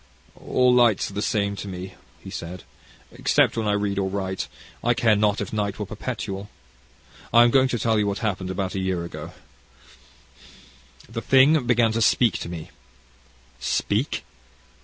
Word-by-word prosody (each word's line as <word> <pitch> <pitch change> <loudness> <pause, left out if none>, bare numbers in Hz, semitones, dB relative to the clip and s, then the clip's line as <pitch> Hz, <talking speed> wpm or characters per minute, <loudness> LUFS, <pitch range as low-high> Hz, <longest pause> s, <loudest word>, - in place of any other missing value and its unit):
"All 125 -1 +2
lights 120 -5 +3
are - - -12
the 105 - -2
same 100 -2 0
to 100 - -6
me," 95 0 -7 0.3
he - - -9
said; 85 +1 -7 0.5
"except - - +2
when 110 -2 -1
I 105 - +2
read 100 -1 -1
or 95 -1 0
write, 95 -1 -3 0.4
I 120 0 +2
care 115 -3 +3
not 105 0 +2
if - - -5
night 105 -1 -1
were 105 - -3
perpetual. 105 -2 -5 0.8
I 120 - +7
am 120 - +4
going 135 0 +4
to 125 - -1
tell 110 -1 +1
you 105 - +1
what 100 0 -1
happened 95 -3 -2
about 95 0 -3
a 95 - -2
year 95 -2 -1
ago. 85 - -8 1.7
The 115 +1 -5
thing 135 +1 +4
began 120 -2 +3
to 115 +1 -1
speak 115 0 +3
to - - -6
me." 85 -3 -7 0.9
"Speak! - - -1
105 Hz, 170 wpm, -24 LUFS, 95-115 Hz, 1.7 s, I